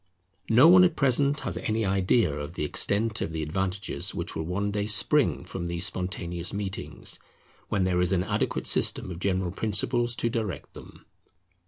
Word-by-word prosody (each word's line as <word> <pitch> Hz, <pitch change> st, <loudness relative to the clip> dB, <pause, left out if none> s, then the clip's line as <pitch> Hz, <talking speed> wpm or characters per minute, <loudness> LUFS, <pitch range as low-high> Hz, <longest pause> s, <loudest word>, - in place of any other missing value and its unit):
No 120 Hz, +7 st, +7 dB
one 180 Hz, +1 st, +8 dB
at 175 Hz, -3 st, +3 dB
present 140 Hz, +2 st, +2 dB
has -, -, -3 dB
any 110 Hz, 0 st, -1 dB
idea 95 Hz, -2 st, +2 dB
of 75 Hz, +3 st, -6 dB
the 75 Hz, -, -2 dB
extent 110 Hz, +7 st, 0 dB
of -, -, -2 dB
the 80 Hz, -1 st, -2 dB
advantages 95 Hz, +3 st, -2 dB
which 85 Hz, -2 st, -4 dB
will 80 Hz, -, -2 dB
one 100 Hz, +3 st, -2 dB
day 100 Hz, 0 st, -2 dB
spring 120 Hz, 0 st, +2 dB
from 90 Hz, -1 st, -5 dB
these 85 Hz, +1 st, -2 dB
spontaneous 90 Hz, -1 st, -3 dB
meetings, 100 Hz, -1 st, -4 dB, 0.5 s
when 95 Hz, -, +1 dB
there 90 Hz, -1 st, +1 dB
is 90 Hz, 0 st, +1 dB
an 90 Hz, -2 st, +1 dB
adequate -, -, -2 dB
system -, -, +2 dB
of 85 Hz, -, -7 dB
general 95 Hz, -1 st, -1 dB
principles 120 Hz, +5 st, 0 dB
to 115 Hz, -, -1 dB
direct 110 Hz, -, -4 dB
them. -, -, -14 dB
95 Hz, 175 wpm, -27 LUFS, 90-115 Hz, 0.5 s, one